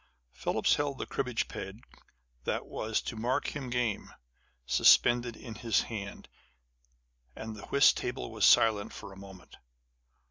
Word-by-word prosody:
Phillips 65 - +1
held 145 -2 -2
the - - -4
cribbage 125 -2 -2
peg 95 +4 -8 0.6
that - - -2
was 110 0 -2
to - - -5
mark 120 +6 -1
him 135 -4 -5
game, 120 -4 -1 0.5
suspended 120 - +4
in 115 - -9
his 110 0 +1
hand; 100 -4 -7 1.1
and 110 0 -7
the 105 - -10
whist 140 +1 +5
table 125 -1 -4
was 110 - -3
silent 105 -2 +5
for 100 -2 -9
a - - -13
moment. 95 -2 -13
110 Hz, 140 wpm, -30 LUFS, 100-125 Hz, 1.1 s, whist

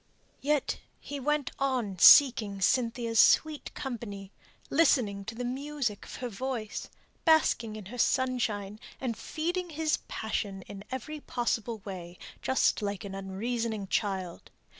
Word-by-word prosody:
Yet 290 +1 0 0.2
he 285 0 -6
went 295 0 0
on 250 -9 -1
seeking 220 -5 +7
Cynthia's 230 +1 +1
sweet 310 -2 +4
company, 215 -8 -6 0.4
listening 250 -10 +3
to 225 - -6
the 245 +1 -4
music 265 -4 -3
of - - -8
her 250 - -4
voice, 235 -1 -4 0.3
basking 310 -9 +3
in 215 -2 -8
her 245 +6 -8
sunshine, 225 -6 0 0.2
and 250 -4 -2
feeding 350 +7 -3
his 310 -1 0
passion 200 -3 -3
in 200 +1 -9
every 260 +4 -5
possible 235 -5 -2
way, 180 -3 -7 0.2
just 260 -3 +2
like 200 0 -3
an 195 - -6
unreasoning 215 +3 -3
child. 190 -5 -2
235 Hz, 130 wpm, -29 LUFS, 200-270 Hz, 0.4 s, seeking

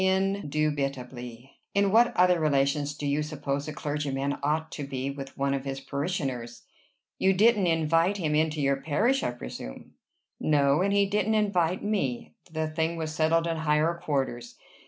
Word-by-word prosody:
"Indubitably. 140 - -2 0.2
In 200 -1 +3
what 235 +3 +4
other 180 -1 +5
relations 145 -1 +1
do 145 - -5
you 145 +1 +1
suppose 145 -2 -3
a - - -3
clergyman 145 -2 -2
ought 155 +3 -1
to 145 - -5
be 135 0 -3
with 135 -1 -8
one 140 0 +1
of 135 -1 -2
his 135 0 -4
parishioners?" 135 -6 -3 0.6
"You 190 0 +4
didn't 210 0 +4
invite 165 +4 +2
him 155 -5 -1
into 155 0 +1
your 140 0 +2
parish, 225 - +1
I - - 0
presume." 90 - -8 0.5
"No; 145 0 +3
and 200 +1 +2
he 200 0 +4
didn't 210 +2 +1
invite 185 -4 +1
me. 135 - -2 0.2
The 160 0 -1
thing 160 +1 -1
was 160 -1 -4
settled 165 +1 +2
in 165 -1 -1
higher 155 +1 +2
quarters. 135 -7 -3
155 Hz, 160 wpm, -27 LUFS, 140-180 Hz, 0.6 s, other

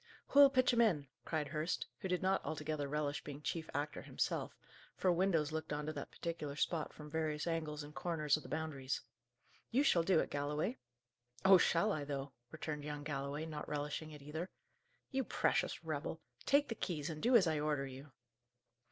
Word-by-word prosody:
"Who'll 280 0 +9
pitch 255 -2 +4
'em 235 - +5
in?" 170 -11 +3 0.2
cried 155 -3 -1
Hurst, 155 +3 -1
who 195 - -3
did 180 0 0
not 190 +1 +2
altogether 150 -1 -2
relish 145 0 -1
being 145 0 -7
chief 160 0 -2
actor 145 +1 -2
himself, - - -2 0.4
for 185 - +3
windows 170 -4 +2
looked 160 0 -3
on 150 0 -1
to 155 - -2
that 145 - -5
particular 160 -4 -4
spot 155 +1 0
from 150 - -10
various 155 -1 -1
angles 155 -3 -2
and 145 +1 -10
corners 155 -4 +1
of 155 - -4
the - - -11
Boundaries. 145 -4 -2 0.7
"You 260 +5 +3
shall 175 - +5
do 165 0 +4
it, - - -1
Galloway!" 145 -2 -1 0.7
"Oh 190 -1 +9
shall 175 +5 +3
I, 155 -6 -1
though!" 140 -1 -4 0.2
returned 155 0 -4
young 145 0 -4
Galloway, 145 +1 -3
not 155 -2 -5
relishing 150 +1 -2
it 150 -2 -10
either. 160 +5 -4 0.6
"You 265 0 +1
precious - - +1
rebel! - - -3 0.3
Take 285 0 +4
the - - 0
keys, 170 -9 -3
and 155 -1 -6
do 245 +1 +4
as 210 -6 +8
I 155 -2 +1
order 150 -2 0
you!" 135 +2 -9
155 Hz, 185 wpm, -37 LUFS, 145-170 Hz, 0.7 s, Who'll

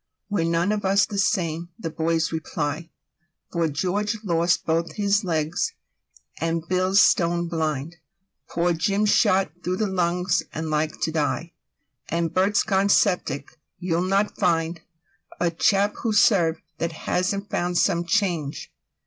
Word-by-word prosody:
''We're 165 -5 +1
none 170 +4 +1
of 210 -1 -1
us 195 +1 +3
the 200 - -4
same!' 175 -5 0
the 165 -7 -5
boys 160 0 0
reply.'For 160 +1 -5
George 195 +9 -1
lost 170 -2 +1
both 165 +1 0
his 205 0 +1
legs; 165 - -1 0.7
and 165 0 -2
Bill's 185 +2 +2
stone 170 -3 +3
blind;'Poor 170 +3 -3
Jim's 200 +5 +1
shot 195 -6 +3
through 180 +1 -1
the 215 - 0
lungs 180 0 0
and 160 0 -4
like 155 +1 -1
to 160 - 0
die;'And 165 +1 -4
Bert's 195 +4 +2
gone 195 0 +1
syphilitic: 160 -7 +1 0.2
you'll 175 -1 -1
not 195 +3 +1
find'A 165 -1 -2
chap 200 0 +3
who's 220 -3 +2
served 170 -6 +3 0.2
that 165 0 -2
hasn't 195 +3 -1
found 175 0 -1
some 170 -2 +2
change. 170 -7 -1
175 Hz, 130 wpm, -24 LUFS, 165-195 Hz, 0.7 s, us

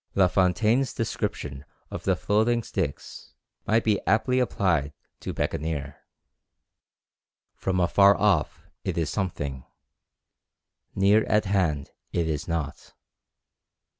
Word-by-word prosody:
La 95 -2 +5
Fontaine's 105 +8 +2
description 75 -10 -3 0.3
of - - -6
the - - +3
floating 115 +3 +1
sticks 85 -9 -5 0.3
might 110 +2 +3
be 105 -3 +1
aptly 125 +5 +2
applied 85 - 0 0.3
to - - -5
Bekaneer. 75 -2 -3 1.6
"From 95 -1 -2
afar 100 +3 +5
off 100 -7 +1 0.2
it - - -3
is 80 -3 0
something, 70 -9 -3 1.3
near 100 +3 +4
at 105 0 +2
hand 90 -8 0 0.2
it 85 -1 0
is 75 -2 -3
nought." 80 -4 -4
95 Hz, 105 wpm, -26 LUFS, 75-105 Hz, 1.6 s, La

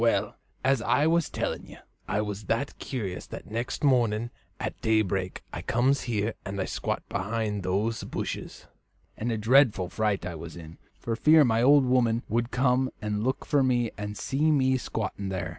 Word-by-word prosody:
"Well, 115 -1 +2 0.3
as 135 -2 +3
I 145 +6 +2
was 165 0 +2
telling - - -3
you, - - -12 0.3
I 105 - 0
was 105 -1 -5
that 115 +8 -2
curious 105 -9 -4
that - - -9
next 120 +6 -3
morning 120 -4 +2 0.3
at - - -4
daybreak 100 -4 0
I - - -4
comes 130 +3 +2
here 110 0 0
and 100 -1 -5
squats - - -2
behind 105 +1 -2
those 100 +5 -1
bushes, - - -5 0.5
and 115 +2 -2
a 115 - 0
dreadful 110 -5 +4
fright 100 -1 0
I 90 - -4
was 80 0 -8
in 80 -1 -11 0.2
for 115 - -3
fear 155 +5 +6
my 115 -1 +2
old 140 +2 +6
woman 120 -2 +2
would 120 +1 0
come 130 0 +2
and 105 0 -2
look 130 +2 -1
for 145 - +3
me 120 -3 +2
and 105 0 -5
see 145 +4 +1
me 130 -3 +3
squatting 105 -4 -4
there." 95 -1 -3
115 Hz, 175 wpm, -27 LUFS, 105-130 Hz, 0.5 s, fear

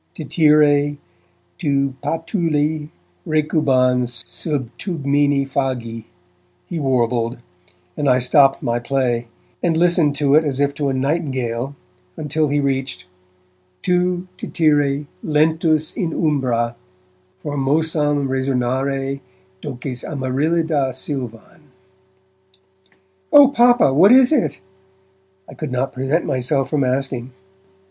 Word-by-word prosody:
Tityre, 150 -1 +3 0.6
tu 140 -2 0
patulae 160 -3 -1 0.3
recubans 130 -6 +1
sub 145 -7 -4
tegmine 145 -5 0
fagi, 125 -5 -3 0.6
he 170 - -5
warbled; 120 -3 0 0.6
and 145 - 0
I 125 - +4
stopped 135 +2 +3
my 120 -2 0
play, 120 -2 -1 0.3
and 165 -2 +1
listened 165 -4 +2
as 145 -1 +2
if 140 0 +1
to 145 -1 -2
a - - -1
nightingale, 130 -3 -2 0.4
until 155 +1 -1
he 145 +1 0
reached 135 -9 -2 0.8
tu, 180 0 0
Tityre, 145 -3 +1 0.2
lentus 155 0 +1
in 170 -6 -2
umbra 125 -7 0 0.7
Formosam 145 0 0
resonare 135 +1 -1 0.4
doces 125 0 -6
Amaryllida 145 +1 -1
silvan. 125 -6 -6 1.7
'Oh 285 -2 +8
Papa, 240 - +4
what 185 +9 +6
is 255 +1 +6
that?' 285 - +1 0.9
I - - -11
could 155 -4 -6
not 130 +1 -2
prevent 135 +6 -1
myself 130 +1 -1
from 150 -3 +1
asking. 130 -1 -2
140 Hz, 100 wpm, -20 LUFS, 130-155 Hz, 1.7 s, Oh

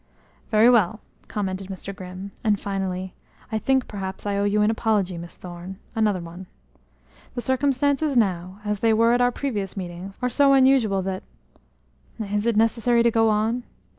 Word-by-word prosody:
"Very 220 +1 +5
well!" 220 -4 +4 0.3
commented 195 -2 -3
Mr. 195 0 -7
Grimm, 185 +1 -8
and 210 -3 +2
finally: 190 -2 -3 0.4
"I 220 - 0
think, 265 +2 +1
perhaps, 190 -2 -6
I 205 -1 0
owe 200 0 +1
you 210 +1 +2
an 210 - +3
apology, 210 -5 0
Miss 170 0 -8
Thorne 180 +1 -8 0.2
another 210 -4 +2
one. 170 +2 -9 0.9
The 245 - -2
circumstances 280 +2 +1
now, 185 -2 0
as 210 -1 -1
they 225 +1 +3
were 230 +2 +4
at 245 - +2
our 245 0 +4
previous 210 -8 -3
meetings, 180 +1 -6
are 250 - 0
so 275 +3 +4
unusual 260 -8 +4
that 190 0 -3 1.0
is 210 +1 -1
it 230 -2 +2
necessary 230 +1 +3
to 235 - +4
go 225 0 +3
on?" 220 +3 +1
210 Hz, 165 wpm, -24 LUFS, 190-235 Hz, 1.0 s, Very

